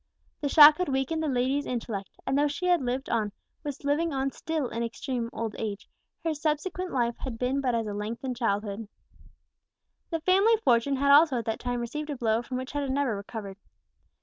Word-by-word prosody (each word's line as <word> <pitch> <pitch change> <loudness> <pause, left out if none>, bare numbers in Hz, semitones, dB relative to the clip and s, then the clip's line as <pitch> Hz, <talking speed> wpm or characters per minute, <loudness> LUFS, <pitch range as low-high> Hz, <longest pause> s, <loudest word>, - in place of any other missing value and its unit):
The 285 - 0
shock 300 +2 +9
had 360 - 0
weakened 270 +4 0
the 315 - -1
lady's 265 +2 0
intellect; 225 -5 -4 0.2
and 270 - 0
though 290 +1 +3
she 295 +5 -4
had 355 -3 +3
lived 255 +2 -2
on, 215 -3 0 0.3
was 290 -2 -6
living 300 +4 +1
on 270 -1 -1
still 315 -3 -2
in 230 - -4
extreme 235 +1 -3
old 225 -2 -4
age, 210 -2 -4 0.4
her 325 -1 0
subsequent 310 +5 -2
life 240 -2 0
had 255 -4 -5
been 255 +3 0
but 250 -3 +1
as 225 -1 0
a 210 - -4
lengthened 230 +5 -4
childhood. 210 -2 -2 1.2
The 330 - -1
family 390 +6 +4
fortune 245 +3 +3
had 280 +1 +3
also 290 -2 +6
at 230 - -3
that 225 - -2
time 245 -1 -2
received 300 +6 -4
a 290 - -3
blow 225 -2 +1
from 250 +1 -5
which 260 +2 -6
it - - +1
had 280 -1 -2
never 265 -4 0
recovered. 200 -1 -7
260 Hz, 205 wpm, -28 LUFS, 230-290 Hz, 1.2 s, shock